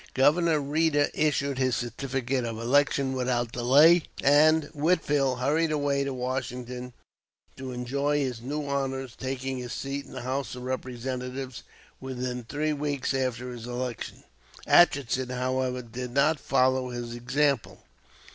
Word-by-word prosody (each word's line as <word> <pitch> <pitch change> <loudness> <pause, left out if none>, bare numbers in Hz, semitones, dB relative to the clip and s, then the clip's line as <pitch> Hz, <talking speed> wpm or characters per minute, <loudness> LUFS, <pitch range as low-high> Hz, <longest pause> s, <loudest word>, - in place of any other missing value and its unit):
Governor 155 +4 +4
Reeder 145 +1 +2
issued 140 -3 0
his 130 -2 +2
certificate 130 +1 -2
of 115 -1 -4
election 135 +3 +2
without 125 -2 -1
delay, 145 +9 +6 0.2
and 155 +3 +5
Whitfield 145 -4 +1
hurried 155 +5 +1
away 145 -2 +1
to 140 - -2
Washington 125 -1 -4 0.6
to 130 -1 -6
enjoy 140 +4 -1
his 130 -5 -2
new 145 +4 -4
honors, 135 -2 -2
taking 130 0 -4
his 125 -1 -5
seat 140 +1 -4
in - - -13
the 130 - -6
House 130 +1 -3
of 125 - -8
Representatives 130 0 -4 0.4
within 125 -1 -4
three 150 +5 -1
weeks 145 -2 -2
after 125 -2 -2
his 120 -1 -8
election. 125 -1 -5 0.4
Atchison, 130 -6 +4
however, 125 0 -1
did 125 +2 -6
not 140 +4 +2
follow 130 -1 +2
his 120 -1 -5
example. 130 +2 0
130 Hz, 135 wpm, -27 LUFS, 125-140 Hz, 0.6 s, delay